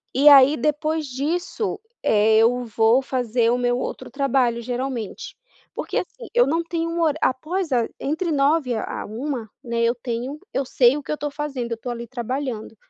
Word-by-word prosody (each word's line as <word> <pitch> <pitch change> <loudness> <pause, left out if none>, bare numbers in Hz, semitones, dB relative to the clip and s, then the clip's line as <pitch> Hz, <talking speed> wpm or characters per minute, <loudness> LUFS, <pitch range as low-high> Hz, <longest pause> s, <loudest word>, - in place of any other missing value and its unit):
e 280 +3 +4
aí 280 +1 +8
depois 305 +1 0
disso, 340 - -2 0.2
eh, 220 +1 +4
eu 245 +2 +3
vou 225 +3 +3
fazer 245 -3 0
o 245 - +2
meu 245 0 +1
outro 255 - -5
trabalho, 255 -3 +1
geralmente. 245 -2 -4 0.4
Porque, - - -3
assim, 470 +6 -5
eu 485 - +4
não 330 +4 +1
tenho 335 0 -2
um 335 0 -2
horá 310 -2 +2
após 320 +6 -1
a 240 -3 +2
entre 320 +5 -1
9h 280 -2 +2
a 220 - -4
13h, 235 0 -4
né, 235 -1 -2
eu 230 0 +3
tenho 245 +4 -5
eu 270 - 0
sei 250 0 +4
o 295 - -6
que - - -6
eu - - +1
estou 295 0 -3
fazendo, 280 -5 -4
eu - - 0
estou 245 +2 -6
ali 235 0 -6
trabalhando. 245 -2 -4
260 Hz, 185 wpm, -23 LUFS, 235-300 Hz, 0.4 s, aí